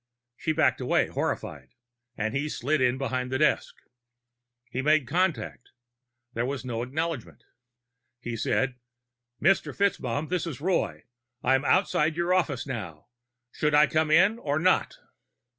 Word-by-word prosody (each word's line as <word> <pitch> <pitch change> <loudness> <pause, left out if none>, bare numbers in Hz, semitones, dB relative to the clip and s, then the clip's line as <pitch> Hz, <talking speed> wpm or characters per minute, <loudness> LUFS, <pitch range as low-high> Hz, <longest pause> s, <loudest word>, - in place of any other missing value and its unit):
She 160 - -2
backed 140 -6 +2
away, 125 - +1
horrified, 65 -1 -4 0.4
and 110 +2 -2
he 145 +2 -1
slid 145 +1 0
in 125 0 +2
behind 130 -2 -2
the 130 - +1
desk. 155 +2 +1 1.0
He 130 - -2
made 150 0 +3
contact; 170 -4 -1 0.6
there 115 - -1
was 135 -1 -4
no 115 -2 -3
acknowledgment. 130 - -4 0.8
He 120 -1 -5
said, 125 +3 0 0.6
"Mr. 190 +5 +2
FitzMaugham, 150 -7 0
this 180 -1 -1
is 145 -7 -6
Roy. 175 +4 -1 0.4
I'm 135 +2 +3
outside 155 -3 +2
your 170 +1 +1
office 145 -8 0
now. 105 - -7 0.4
Should 150 -1 0
I 150 +1 +7
come 155 +1 0
in, 195 +8 +4
or 145 -8 -1
not?" 185 +4 +2
145 Hz, 140 wpm, -27 LUFS, 125-160 Hz, 1.0 s, I